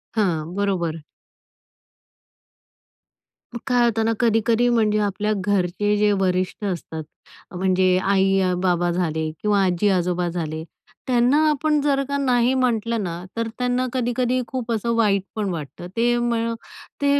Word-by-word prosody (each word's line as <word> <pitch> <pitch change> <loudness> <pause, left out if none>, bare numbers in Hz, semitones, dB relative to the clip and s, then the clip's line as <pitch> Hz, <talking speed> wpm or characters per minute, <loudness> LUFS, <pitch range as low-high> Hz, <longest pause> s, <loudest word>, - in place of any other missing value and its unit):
हां, 170 -5 0
बरोबर. 170 -6 -1 2.5
मग 235 - -5
काय 245 -2 +3
होतं 225 -2 +1
ना, 225 - +2
कधी-कधी 230 0 +2
म्हणजे 215 -3 +2
आपल्या 210 +1 -1
घरचे 205 +1 +1
जे 210 0 +3
वरिष्ठ 185 +3 -1
असतात, 165 -4 -4 0.5
म्हणजे 185 0 +2
आई-बाबा 185 -2 +2
झाले 160 -3 -1
किंवा 205 -1 +2
आजी-आजोबा 180 -1 +1
झाले. 160 -2 -4 0.4
त्यांना 250 +3 +3
आपण 300 +1 +1
जर 275 -1 +1
का 280 0 -1
नाही 250 -2 +2
म्हटलं 235 -3 0
ना, 175 -1 -5
तर 230 - -1
त्यांना 250 +1 0
कधी-कधी 250 0 0
खूप 250 -3 -4
असं 230 +1 0
वाईट 205 -4 +2
पण 210 -3 -1
वाटतं. 165 +1 -6
ते 240 +1 +3
म 230 -1 0 0.5
ते 285 0 +3
210 Hz, 130 wpm, -22 LUFS, 180-240 Hz, 2.5 s, काय